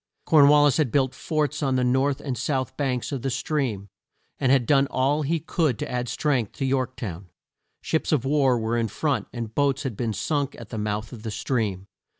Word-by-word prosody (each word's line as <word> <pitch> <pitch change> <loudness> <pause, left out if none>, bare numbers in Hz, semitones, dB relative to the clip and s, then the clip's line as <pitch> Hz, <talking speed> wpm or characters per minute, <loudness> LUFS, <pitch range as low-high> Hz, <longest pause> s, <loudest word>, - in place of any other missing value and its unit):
Corn 150 -3 +6
wal 145 0 +6
lis 145 -3 +4
had 145 -7 +1
built 135 -2 +2
forts 155 -1 -2
on 135 -3 +1
the 130 - +2
north 130 +3 +1
and 135 -4 -3
south 130 +1 -2
banks 130 -3 -2
of 135 -3 -3
the 135 - -1
stream, 130 -6 -2 0.5
and 130 - +2
had 135 -3 +4
done 140 +2 +4
all 140 +4 +1
he 160 +3 0
could 155 -5 0
to - - -5
add 125 -1 -2
strength 125 -3 0
to 135 - -3
York 130 -1 0
town. 95 -6 -6 0.5
Ships 160 - -1
of 140 -5 +1
war 135 -3 +3
were 115 +1 -1
in 115 - 0
front, 130 -1 -1
and 115 -3 -6
boats 140 0 +1
had 130 -6 -3
been 115 +1 -2
sunk 145 +5 -1
at 115 -3 -10
the 110 - -4
mouth 105 +2 -3
of 115 - -9
the 110 - -5
stream. 105 -4 -2
130 Hz, 215 wpm, -25 LUFS, 115-145 Hz, 0.5 s, Corn